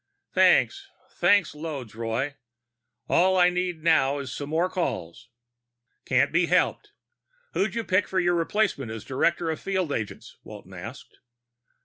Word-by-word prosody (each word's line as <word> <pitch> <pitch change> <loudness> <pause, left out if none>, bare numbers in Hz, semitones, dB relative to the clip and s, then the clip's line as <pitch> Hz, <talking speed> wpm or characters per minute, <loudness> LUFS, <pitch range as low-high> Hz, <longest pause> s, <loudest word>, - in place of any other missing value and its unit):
"Thanks. 395 0 +3 0.2
Thanks 200 -5 +3
loads, 150 -7 -6
Roy. 115 +5 -2 0.7
All 185 +2 +3
I 180 0 +5
need 180 -3 -3
now 150 -4 +3
is 135 -2 -5
some 145 +1 -6
more 165 +3 +1
calls." 125 - -4 0.8
"Can't 130 +2 +2
be 170 +1 +2
helped. 180 +1 +1 0.6
Who'd 205 +3 0
you 230 - -1
pick 185 -1 +1
for 190 - 0
your 175 -1 +2
replacement 170 - 0
as 110 -1 -7
director 165 +5 0
of 160 - -4
field 190 -5 -2
agents?" 110 -6 -5
Walton 100 -3 -12
asked. 110 +9 -10
160 Hz, 140 wpm, -26 LUFS, 130-180 Hz, 0.8 s, I